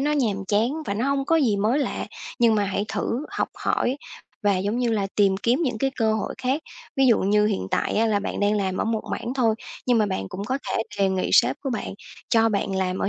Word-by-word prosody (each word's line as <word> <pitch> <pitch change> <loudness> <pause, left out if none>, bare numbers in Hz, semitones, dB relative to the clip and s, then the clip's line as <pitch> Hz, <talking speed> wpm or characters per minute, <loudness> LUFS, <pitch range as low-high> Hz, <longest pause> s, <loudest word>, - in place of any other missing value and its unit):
nó 295 +2 +1
nhàm 215 -9 0
chán 215 +4 +2 0.2
và 200 - -1
nó 235 +6 0
hông 275 -1 +1
có 325 +4 +3
gì 240 -10 +3
mới 220 +7 +2
lạ. 285 - -2 0.3
Nhưng 235 -3 +5
mà 205 -1 +2
hãy 200 +1 -1
thử 265 +6 -2
học - - -1 0.2
hỏi 255 - +1 0.5
và, 205 -2 +3
giống 205 +5 -1
như 245 -2 +1
là, 200 -3 0
tìm 195 -2 +4
kiếm 240 - +1
những 245 -7 -1
cái 270 +4 +1
cơ 220 -3 +2
hội 220 - -3
khác. 265 +5 0 0.3
Ví 270 -1 +4
dụ 230 - +5
như 210 +2 +3
hiện 200 - -1
tại - - 0
á, 225 +2 +3
là 210 -2 +2
bạn 200 - -4
đang 205 +1 +2
làm 190 -2 -1
ở - - 0
một 225 -1 0
mảng 240 +2 -3
thôi, 235 -5 +2 0.3
nhưng 245 -2 +4
mà 215 - +3
bạn 95 - -3
cũng 195 - -5
có 260 +5 -1
thể - - 0 0.2
đề 195 -1 +3
nghị 190 -1 -1
sếp 125 +3 +5
của 270 - -2
bạn, 215 -5 -3 0.3
cho 225 0 +4
bạn 200 -2 -1
làm 185 0 -1
ở - - 0
220 Hz, 255 wpm, -24 LUFS, 200-250 Hz, 0.5 s, Nhưng